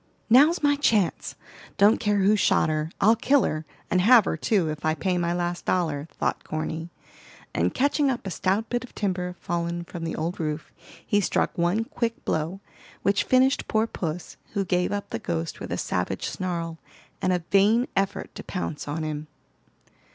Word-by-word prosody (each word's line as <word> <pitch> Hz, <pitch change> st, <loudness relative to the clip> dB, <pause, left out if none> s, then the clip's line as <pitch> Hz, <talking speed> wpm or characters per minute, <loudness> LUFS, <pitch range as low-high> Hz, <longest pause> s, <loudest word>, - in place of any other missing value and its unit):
"Now's 300 Hz, +7 st, +6 dB
my 290 Hz, 0 st, +4 dB
chance! 215 Hz, -10 st, +1 dB, 0.4 s
Don't 205 Hz, +2 st, +5 dB
care 205 Hz, -3 st, +1 dB
who 205 Hz, +2 st, +5 dB
shot 190 Hz, -, +3 dB
her, 155 Hz, 0 st, -1 dB
I'll 220 Hz, +3 st, +5 dB
kill 265 Hz, +3 st, +3 dB
her, 155 Hz, 0 st, -2 dB, 0.2 s
and 180 Hz, -, +3 dB
have 230 Hz, +1 st, +7 dB
her -, -, 0 dB
too, 195 Hz, -7 st, +1 dB
if 150 Hz, -, -7 dB
I 155 Hz, 0 st, +1 dB
pay 180 Hz, +4 st, 0 dB
my 170 Hz, 0 st, 0 dB
last 175 Hz, 0 st, -2 dB
dollar," 160 Hz, -5 st, 0 dB
thought -, -, -1 dB
Corny; 160 Hz, +1 st, -4 dB, 0.6 s
and -, -, +1 dB
catching 285 Hz, +1 st, +2 dB
up 255 Hz, -3 st, -2 dB
a 190 Hz, -, -3 dB
stout 195 Hz, +5 st, 0 dB
bit 245 Hz, 0 st, -2 dB
of 250 Hz, -, -13 dB
timber 180 Hz, -3 st, -2 dB
fallen 170 Hz, 0 st, -2 dB
from 170 Hz, -1 st, -8 dB
the 165 Hz, -, -3 dB
old 165 Hz, +3 st, -3 dB
roof, 155 Hz, -1 st, -3 dB, 0.3 s
he 205 Hz, -, +2 dB
struck -, -, 0 dB
one 175 Hz, +6 st, +1 dB
quick 230 Hz, 0 st, -3 dB
blow, 165 Hz, +5 st, -1 dB, 0.4 s
which 200 Hz, 0 st, +2 dB
finished 260 Hz, +1 st, +3 dB
poor 220 Hz, 0 st, +2 dB
puss, 175 Hz, -6 st, -5 dB, 0.2 s
who 200 Hz, -2 st, 0 dB
gave 180 Hz, 0 st, +1 dB
up 205 Hz, 0 st, -4 dB
the -, -, -2 dB
ghost 85 Hz, -4 st, -3 dB
with -, -, -7 dB
a -, -, -1 dB
savage -, -, -2 dB
snarl, 170 Hz, -3 st, -3 dB, 0.4 s
and 185 Hz, -, +2 dB
a 180 Hz, -2 st, 0 dB
vain 215 Hz, +5 st, +4 dB
effort 195 Hz, 0 st, -1 dB
to -, -, -8 dB
pounce 170 Hz, -6 st, -4 dB
on 155 Hz, +2 st, -3 dB
him. 155 Hz, 0 st, -4 dB
185 Hz, 185 wpm, -25 LUFS, 165-220 Hz, 0.6 s, have